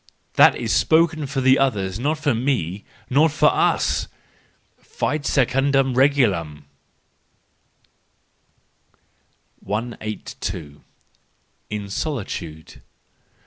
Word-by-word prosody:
That -, -, +6 dB
is -, -, -2 dB
spoken 160 Hz, -2 st, +2 dB
for 135 Hz, 0 st, -2 dB
the 130 Hz, +1 st, +4 dB
others; 100 Hz, -8 st, 0 dB
not 150 Hz, +5 st, 0 dB
for 145 Hz, -3 st, 0 dB
me, 115 Hz, -, -2 dB, 0.3 s
not 150 Hz, +4 st, +4 dB
for 150 Hz, -, +3 dB
us! -, -, +1 dB, 0.7 s
—Fit 145 Hz, -1 st, -3 dB
secundum 135 Hz, 0 st, +2 dB
regulamP 105 Hz, -, +1 dB, 3.0 s
182. 105 Hz, -8 st, -6 dB, 0.9 s
In 105 Hz, -1 st, -5 dB
Solitude. 95 Hz, -, -5 dB
130 Hz, 80 wpm, -22 LUFS, 100-140 Hz, 3.0 s, That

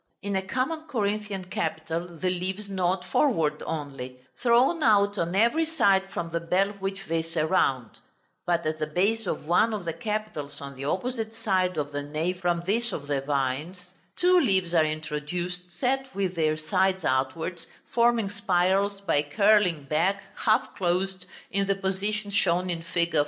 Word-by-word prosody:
In 200 Hz, 0 st, -2 dB
a 190 Hz, -, +2 dB
common 270 Hz, +10 st, -2 dB
Corinthian 210 Hz, -6 st, -2 dB
capital 165 Hz, -1 st, -3 dB
the 185 Hz, +2 st, 0 dB
leaves 185 Hz, +3 st, -3 dB
nod 185 Hz, -1 st, 0 dB
forward 165 Hz, -, +1 dB
only, 135 Hz, -5 st, -5 dB, 0.2 s
thrown 255 Hz, +7 st, +4 dB
out 205 Hz, -5 st, +4 dB
on 170 Hz, +2 st, -1 dB
every 235 Hz, +11 st, +3 dB
side 195 Hz, -12 st, +2 dB
from 170 Hz, -1 st, -4 dB
the 170 Hz, -, 0 dB
bell 180 Hz, +4 st, +1 dB
which 195 Hz, -1 st, -5 dB
they 165 Hz, -2 st, 0 dB
surround: 155 Hz, -6 st, 0 dB, 0.5 s
but 170 Hz, -1 st, +1 dB
at 155 Hz, 0 st, -1 dB
the 155 Hz, -, -1 dB
base 200 Hz, +7 st, 0 dB
of 155 Hz, -, -3 dB
one 215 Hz, +7 st, +3 dB
of 200 Hz, -4 st, -6 dB
the 165 Hz, -, -2 dB
capitals 210 Hz, -, -4 dB
on 140 Hz, 0 st, -8 dB
the 135 Hz, +2 st, -6 dB
opposite 225 Hz, -, -2 dB
side 185 Hz, -5 st, 0 dB
of 145 Hz, -1 st, -2 dB
the 145 Hz, 0 st, -3 dB
nave 155 Hz, +5 st, -2 dB
from 175 Hz, -1 st, +1 dB
this 230 Hz, +4 st, +1 dB
of 145 Hz, -, -5 dB
the 145 Hz, -1 st, -1 dB
vines, 145 Hz, +6 st, -2 dB, 0.2 s
two 360 Hz, 0 st, +5 dB
leaves 190 Hz, -, +1 dB
are 165 Hz, -2 st, +5 dB
introduced 155 Hz, +4 st, -3 dB
set 260 Hz, +10 st, -1 dB
with 195 Hz, -2 st, 0 dB
their 155 Hz, -2 st, +1 dB
sides 190 Hz, +3 st, +1 dB
outwards, 135 Hz, +7 st, -1 dB, 0.3 s
forming 235 Hz, -3 st, +3 dB
spirals 195 Hz, 0 st, +1 dB
by 165 Hz, -7 st, +2 dB
curling 190 Hz, 0 st, +3 dB
back, 180 Hz, +8 st, +1 dB
half 215 Hz, -1 st, +1 dB
closed, 185 Hz, +1 st, -1 dB, 0.2 s
in 195 Hz, 0 st, 0 dB
the 195 Hz, -, +2 dB
position 200 Hz, +2 st, -2 dB
shown 180 Hz, -2 st, +2 dB
in 165 Hz, -1 st, -3 dB
fig. 170 Hz, -1 st, -1 dB
185 Hz, 165 wpm, -27 LUFS, 160-205 Hz, 0.5 s, two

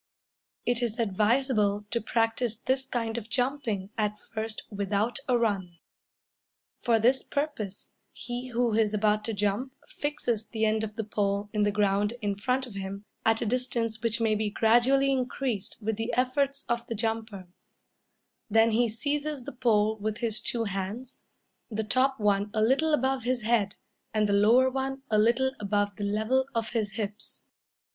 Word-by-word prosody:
It 245 Hz, 0 st, +1 dB
is 230 Hz, -2 st, -1 dB
advisable 215 Hz, -1 st, +2 dB
to 235 Hz, -, 0 dB
practice 225 Hz, +1 st, 0 dB
this 260 Hz, +3 st, -1 dB
kind 230 Hz, -2 st, -2 dB
of 225 Hz, 0 st, -13 dB
jumping 245 Hz, -6 st, -1 dB
at 210 Hz, 0 st, 0 dB, 0.2 s
first 220 Hz, 0 st, -4 dB
without 205 Hz, +4 st, -1 dB
a 245 Hz, -, +4 dB
run. 195 Hz, -7 st, -1 dB, 1.0 s
For 235 Hz, -2 st, +3 dB
this 245 Hz, +4 st, +3 dB
purpose 280 Hz, -10 st, -4 dB, 0.2 s
he 245 Hz, +1 st, -5 dB
who 240 Hz, -2 st, +1 dB
is 215 Hz, -1 st, +2 dB
about 210 Hz, 0 st, +2 dB
to 225 Hz, -, -2 dB
jump 210 Hz, +6 st, -1 dB
fixes 240 Hz, -7 st, -2 dB
the 220 Hz, -1 st, 0 dB
end 220 Hz, 0 st, +1 dB
of 215 Hz, -1 st, -5 dB
the 225 Hz, -, -2 dB
pole 205 Hz, -1 st, -1 dB
in 210 Hz, -, +1 dB
the 205 Hz, 0 st, +3 dB
ground 205 Hz, +1 st, +1 dB
in 205 Hz, -3 st, -1 dB
front 250 Hz, +6 st, 0 dB
of 240 Hz, -, -10 dB
him, 195 Hz, +1 st, -6 dB, 0.2 s
at 225 Hz, +1 st, +3 dB
a -, -, -2 dB
distance 230 Hz, -2 st, -1 dB
which 230 Hz, 0 st, +1 dB
may 225 Hz, -1 st, +2 dB
be 215 Hz, 0 st, 0 dB
gradually 245 Hz, +6 st, +4 dB
increased 250 Hz, -5 st, -2 dB
with 220 Hz, 0 st, -1 dB
the 225 Hz, +2 st, -2 dB
efforts 275 Hz, +3 st, +1 dB
of 235 Hz, 0 st, -1 dB
the 230 Hz, -, -3 dB
jumper; 220 Hz, -3 st, -3 dB, 1.0 s
then 225 Hz, +2 st, +5 dB
he 235 Hz, +1 st, +3 dB
seizes 285 Hz, +4 st, -2 dB
the -, -, -6 dB
pole 220 Hz, -4 st, +2 dB
with 215 Hz, +1 st, -2 dB
his 225 Hz, -3 st, -1 dB
two 235 Hz, -1 st, -1 dB
hands 205 Hz, +5 st, -4 dB, 0.5 s
the 220 Hz, -1 st, -2 dB
top 260 Hz, +4 st, +2 dB
one 205 Hz, -1 st, +2 dB
a 215 Hz, -, +2 dB
little 275 Hz, +7 st, +3 dB
above 265 Hz, -2 st, +1 dB
his 245 Hz, 0 st, -1 dB
head, 215 Hz, -3 st, +1 dB, 0.4 s
and 215 Hz, -1 st, +3 dB
the 200 Hz, -, +1 dB
lower 225 Hz, +6 st, +5 dB
one 270 Hz, +1 st, -2 dB
a 215 Hz, -, +4 dB
little 240 Hz, +4 st, +3 dB
above 205 Hz, 0 st, 0 dB
the 205 Hz, -, -4 dB
level 220 Hz, +6 st, +1 dB
of 225 Hz, -1 st, -1 dB
his 215 Hz, -4 st, -1 dB
hips. 210 Hz, -1 st, -5 dB
225 Hz, 170 wpm, -28 LUFS, 210-250 Hz, 1.0 s, then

